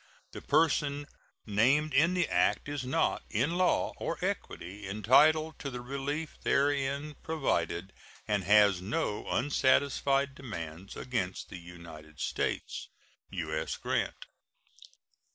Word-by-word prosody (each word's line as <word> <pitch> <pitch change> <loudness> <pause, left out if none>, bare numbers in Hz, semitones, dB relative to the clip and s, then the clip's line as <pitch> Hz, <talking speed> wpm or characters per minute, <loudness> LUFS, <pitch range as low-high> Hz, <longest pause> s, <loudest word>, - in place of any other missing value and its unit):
The - - -8
person 145 -2 +2 0.4
named 130 +9 +3
in 165 +7 +4
the 175 -1 +2
act - - +1
is 145 -2 -3
not, 130 +1 +1
in 125 +9 +1
law 180 0 +2
or - - -3
equity, 95 +3 -4
entitled 150 +9 +4
to 140 - -4
the 125 -2 -6
relief 140 +4 -4
therein 140 +1 +1
provided, 95 - -1 0.3
and 105 -2 +1
has 100 -2 +5
no 105 - -2
unsatisfied 140 +1 +2
demands 95 - -7
against 110 -8 -3
the 90 - -8
United 85 -3 -12
States. - - -2 0.4
U.S. 80 -2 -3
GRANT. - - -2
130 Hz, 115 wpm, -30 LUFS, 95-145 Hz, 0.4 s, has